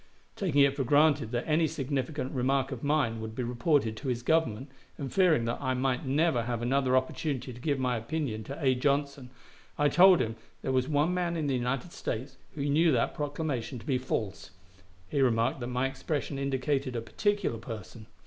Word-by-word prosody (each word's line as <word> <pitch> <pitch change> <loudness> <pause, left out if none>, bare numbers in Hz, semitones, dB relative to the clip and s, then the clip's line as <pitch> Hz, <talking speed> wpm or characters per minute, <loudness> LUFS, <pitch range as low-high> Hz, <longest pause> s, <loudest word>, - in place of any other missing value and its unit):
Taking 160 -8 +2
it 140 0 +3
for 140 - 0
granted 145 -2 +3
that 120 0 -2
any 160 +1 +3
significant 140 -2 -3
remark 135 +1 +1
of 130 -3 -6
mine 140 -7 +1
would 110 0 -6
be 125 - -2
reported 120 -1 +1
to 135 - -6
his 120 -2 -1
Government, 135 -5 +1 0.3
and 140 -3 -5
fearing 170 -11 +4
that 115 - -2
I 130 -2 0
might 130 0 -1
never 145 -2 +2
have 120 0 -3
another 130 +1 +2
opportunity 130 -1 -2
to 120 - -12
give 145 -1 0
my 125 -2 0
opinion 115 -2 -3
to 140 - -6
A. 135 -4 +3
Johnson, 140 0 -1 0.5
I 145 0 +3
told 185 +4 +7
him 115 -2 -2 0.3
there - - -1
was 130 0 +1
one 150 +3 +2
man 175 -2 -1
in 155 - -1
the 140 - 0
United 130 +6 -2
States 130 +4 -5 0.2
who 140 -2 -2
knew 155 +3 +4
that 115 - +1
proclamation 145 -4 -3
to 115 - -11
be 135 -4 +1
false. 105 -7 -3 0.6
He 140 +9 0
remarked 115 -1 +2
that 120 - -4
my 125 +1 0
expression 140 +1 -3
indicated 135 -1 -1
a 115 - -1
particular 205 - -1
person. 110 -1 -9
135 Hz, 195 wpm, -29 LUFS, 125-145 Hz, 0.6 s, told